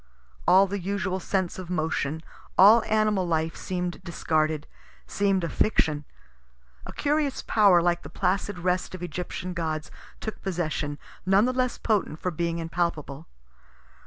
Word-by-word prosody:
All 190 +2 +7
the 200 +1 -3
usual 190 0 -2
sense 185 0 -1
of 180 -2 -7
motion, 160 -2 -1 0.3
all 210 +5 +8
animal 215 -4 +2
life, 160 -1 0
seem'd 180 0 -4
discarded, 155 -3 0 0.4
seem'd 195 -2 +1
a - - 0
fiction; 150 -8 +1 0.8
a - - -7
curious 290 -2 0
power, 195 -6 +5
like 175 0 +1
the - - -10
placid 190 +1 -1
rest 180 +1 -1
of 180 - -8
Egyptian 180 +2 -4
gods, 160 -3 -3 0.3
took 220 - -6
possession, 155 -5 -2 0.3
none 195 +3 +4
the 255 - 0
less 255 -1 0
potent 205 -8 0
for 180 - -2
being 170 0 -2
impalpable. 165 -3 -3
180 Hz, 140 wpm, -26 LUFS, 165-195 Hz, 0.8 s, all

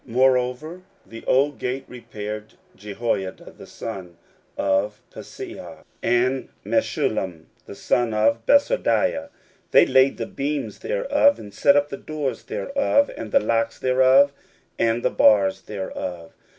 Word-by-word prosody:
16:003:006 115 - -11
Moreover 130 +6 +1 0.2
the 115 - -11
old 140 +2 +2
gate 130 +2 -3
repaired 110 -3 -8 0.2
Jehoiada 100 -2 -4
the - - -13
son 95 -6 -8 0.4
of 100 +2 0
Paseah, - - -10 0.2
and 125 +3 +1 0.2
Meshullam 85 -4 -1 0.2
the - - -9
son 120 +3 0
of 110 +1 +1
Besodeiah; 285 -4 +2 0.4
they - - +6
laid 130 +1 +3
the - - -3
beams 145 +1 -4
thereof, - - +2
and 100 - -11
set 140 +7 +4
up 145 0 +2
the 140 - -6
doors 150 -4 -4
thereof, 280 0 0
and 110 -2 -7
the - - +5
locks 115 +2 0
thereof, 130 +2 +4 0.5
and 115 +1 +1
the - - +1
bars 95 -3 +4
thereof. 90 -4 -6
120 Hz, 130 wpm, -23 LUFS, 105-140 Hz, 0.5 s, they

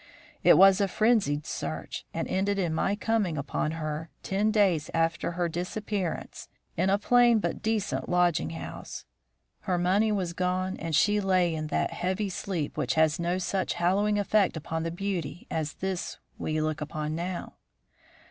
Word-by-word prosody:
It - - +7
was 195 +1 +7
a 200 - +3
frenzied 195 -9 +2
search, 80 - -5
and - - -3
ended 200 +2 0
in 175 -4 0
my 195 +5 +1
coming 210 -7 0
upon 145 +2 -2
her, 155 0 -4
ten 200 +3 +1
days 195 -8 +2
after 165 +1 0
her 175 0 0
disappearance, 180 +2 -4 0.3
in 185 +3 +1
a 200 - +4
plain 240 +2 +5
but 215 - -2
decent 215 -2 -1
lodging 175 - +2
house. 80 -1 -7 0.5
Her 180 -2 -1
money 195 +5 +2
was 185 -4 -1
gone, 185 +1 -1
and 165 -1 -2
she 205 +6 +3
lay 185 -3 +2
in 155 -1 -3
that - - 0
heavy 190 +3 -1
sleep 175 -4 -3
which - - 0
has 160 0 +3
no 175 +1 0
such 185 +1 -1
hallowing 200 +4 +2
effect 205 -3 +2
upon 160 +1 -3
the 165 - -2
beauty 175 -3 -4
as 155 -2 -2
this 190 -1 -4 0.2
we 155 0 -1
look 155 0 -1
upon 150 0 -3
now. 175 +2 -4
180 Hz, 165 wpm, -28 LUFS, 160-200 Hz, 0.5 s, It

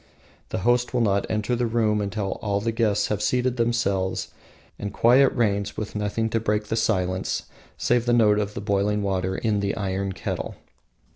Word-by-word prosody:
The - - -2
host 120 +1 +2
will 120 - +2
not 100 -3 +1
enter 110 +3 0
the 120 0 0
room 110 -2 +1
until 100 0 -3
all 100 -3 0
the 115 +3 -1
guests 110 -3 +1
have 105 -1 -1
seated 125 +4 +1
themselves 105 -6 0 0.5
and 100 0 -4
quiet 125 +6 +5
reigns 100 -4 0
with 110 0 -5
nothing 105 +2 -1
to 115 - +1
break 105 -1 -1
the - - 0
silence 95 -4 0 0.3
save 120 0 +1
the - - +3
note 105 -3 +4
of 105 0 -3
the - - -4
boiling 100 0 0
water 95 -1 -1
in 110 -3 0
the 100 0 -1
iron 95 -1 -2
kettle. - - -4
105 Hz, 185 wpm, -24 LUFS, 100-115 Hz, 0.5 s, quiet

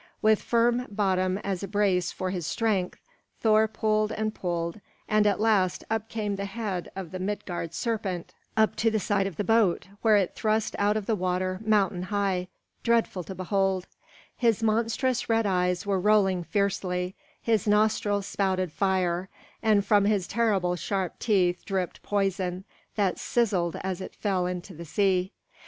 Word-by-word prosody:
With 215 -1 +3
firm 240 +1 +2
bottom 190 -2 +1
as 195 -3 -2
a 200 - -4
brace 195 -4 +1
for 185 0 -3
his 175 -4 -3
strength, 210 -6 0 0.4
Thor 220 0 +4
pulled 215 0 0
and 215 0 -2
pulled, 170 +1 -3 0.3
and 215 -1 +3
at 205 - +1
last 210 -5 +2
up 225 0 -1
came 210 -3 -2
the 200 - -3
head 200 -3 -4
of 190 -4 -6
the 185 - -5
Midgard 180 -4 -4
serpent, 200 -5 -3 0.2
up 220 0 +3
to 225 - +3
the 220 - 0
side 195 0 +1
of 195 - -6
the 205 - -1
boat, 205 -3 +2
where 220 -2 +5
it 190 -3 0
thrust 215 0 0
out 205 +1 +2
of 210 - -3
the 225 - +1
water 185 0 -1
mountain 200 -4 +2
high, 190 -1 -1 0.3
dreadful 230 -5 +1
to 190 - -7
behold; 190 0 0 0.5
his 230 -2 +1
monstrous 230 +3 +1
red 225 -1 +3
eyes 180 -1 +1
were 200 -2 +1
rolling 190 -3 +3
fiercely, 180 0 -1 0.3
his 220 -3 +1
nostrils 210 -1 +2
spouted 185 -4 0
fire, 185 0 0 0.3
and 210 -2 +3
from 205 -2 +4
his 205 -3 +2
terrible 200 -5 +1
sharp 185 0 -3
teeth 180 -5 +2
dripped 190 -3 -3
poison, 190 -2 -1 0.3
that 200 -4 +1
sizzled 195 -8 +1
as 190 -1 -3
it - - -8
fell 190 -4 0
into 180 +1 -5
the 170 +1 -8
sea. 185 +2 +1
200 Hz, 165 wpm, -27 LUFS, 185-215 Hz, 0.5 s, where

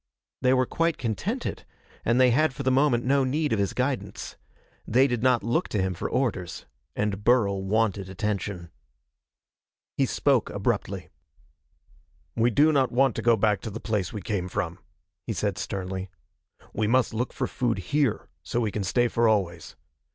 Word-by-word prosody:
They 130 0 +3
were 130 0 +3
quite 165 +5 0
contented, 110 -4 -3 0.4
and 120 +2 +2
they 130 -1 +6
had 145 +2 +2
for 140 - -4
the 130 - +2
moment 130 -3 +3
no 135 +1 +3
need 145 +1 0
of 110 - 0
his 100 - 0
guidance. 130 +1 -3 0.5
They 130 +4 +4
did 120 -4 -1
not 125 -2 +3
look 120 +10 0
to 105 - -2
him 95 0 0
for 85 - -4
orders. 105 -10 -2 0.3
And 105 -1 -2
Burl 105 -6 +3
wanted 100 -1 0
attention. 95 -3 -3 1.2
He - - +2
spoke - - +2
abruptly. - - -2 1.3
"We 115 +2 +3
do 145 +7 +4
not 135 -4 +2
want 130 0 +3
to - - -1
go 115 -1 +4
back 105 -3 +2
to - - -5
the 110 +2 -6
place 105 -6 -2
we 105 -4 -6
came 95 -3 -2
from," 90 -3 -3 0.5
he 115 - -1
said 100 -1 -2
sternly. 95 0 -4 0.6
"We 110 - 0
must 125 +1 +2
look 120 +3 -2
for - - -2
food 120 -4 -1 0.2
here, 145 -7 +1
so 80 - -2
we 110 -3 0
can 105 - -2
stay 120 +5 +2
for 115 0 +2
always. 90 -6 0
115 Hz, 175 wpm, -26 LUFS, 100-130 Hz, 1.3 s, they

